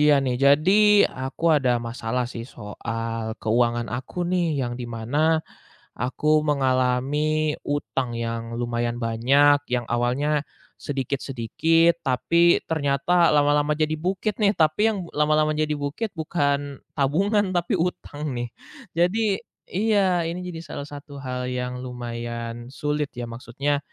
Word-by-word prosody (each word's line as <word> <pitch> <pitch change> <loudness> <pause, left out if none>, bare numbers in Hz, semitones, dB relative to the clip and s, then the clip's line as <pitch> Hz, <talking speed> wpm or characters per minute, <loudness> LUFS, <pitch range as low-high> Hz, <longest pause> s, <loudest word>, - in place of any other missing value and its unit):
iya, 150 -1 +6
nih. 125 -1 0
Jadi, 190 +10 +5
aku 130 +5 -6
ada 130 -4 +3
masalah 120 +1 -2
sih 115 -1 -7
soal 115 +1 -5
keuangan 120 +1 +1
aku 130 +8 -4
nih, 175 -4 0
yang 120 -2 -2
di 125 0 -6
mana 145 +8 +1 0.6
aku 150 +5 +1
mengalami 140 +2 +1
hutang 135 -4 -2
yang 115 0 -4
lumayan 120 0 -1
banyak, 140 +6 +4
yang 125 -1 0
awalnya 140 +5 +1 0.4
sedikit-sedikit, 145 +5 +1
tapi 170 +6 +3
ternyata 160 +3 +2
lama-lama 145 0 +3
jadi 155 0 +1
bukit 190 +4 -1
nih. 200 0 +4
Tapi 155 +3 +3
yang 215 - -2
bu - - -13
lama-lama 155 +1 +3
jadi 155 0 0
bukit 145 +10 -3
bukan 145 -3 -1 0.2
tabungan, 195 +9 +2
tapi 175 -1 0
hutang 155 -4 -3
nih. 120 0 -3 0.5
Jadi 195 +4 +2 0.3
iya, 195 -4 +2
ini 170 +2 -4
jadi 170 -2 -6
salah 140 - -6
satu 145 0 -10
hal 125 -1 -3
yang 125 0 -3
lumayan 120 -1 -5
sulit 150 0 -2
ya, 120 - -3
maksudnya, 130 +5 -2
145 Hz, 130 wpm, -24 LUFS, 120-160 Hz, 0.6 s, iya